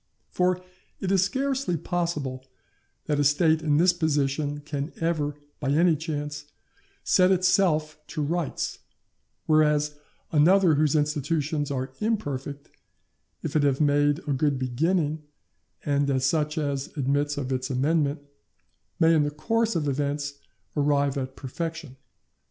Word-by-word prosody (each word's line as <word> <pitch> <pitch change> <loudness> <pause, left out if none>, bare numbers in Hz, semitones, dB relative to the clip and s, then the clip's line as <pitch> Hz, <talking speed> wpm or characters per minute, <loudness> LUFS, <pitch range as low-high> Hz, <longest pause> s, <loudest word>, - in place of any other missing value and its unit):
For 180 0 +1 0.4
it 190 - -2
is 195 -2 +4
scarcely 265 -2 -1
possible 150 -7 -3 0.6
that 145 -1 0
a - - +3
State 155 +2 +3
in 150 -2 +2
this 180 +3 +5
position 145 -3 -1
can 145 0 -4
ever, 155 -3 -1 0.2
by 135 - -2
any 165 +2 +4
chance, 145 -2 -4 0.6
set 185 0 +4
itself 170 -4 +2
to 150 - -3
rights, 165 0 -2 0.7
whereas 150 -1 +3 0.4
another 170 +3 +5
whose 150 0 +2
institutions 150 0 0
are 130 -1 -3
imperfect, 145 - -3 0.7
if - - -4
it 155 - +4
have 140 -2 +2
made 145 -1 +3
a 145 - +1
good 140 +1 +1
beginning 150 +5 0 0.6
and 140 -2 +1
such 150 +2 +1
as 140 -3 -1
admits 145 +2 0
of 135 -2 -2
its 130 +1 -2
amendment, 145 +2 0 0.8
may 165 0 +5
in 155 - +4
the 145 - +1
course 225 +9 0
of 155 -3 0
events 140 0 -2 0.4
arrive 145 -1 +2
at 130 -1 -4
perfection. 155 0 -5
150 Hz, 130 wpm, -26 LUFS, 140-165 Hz, 0.8 s, this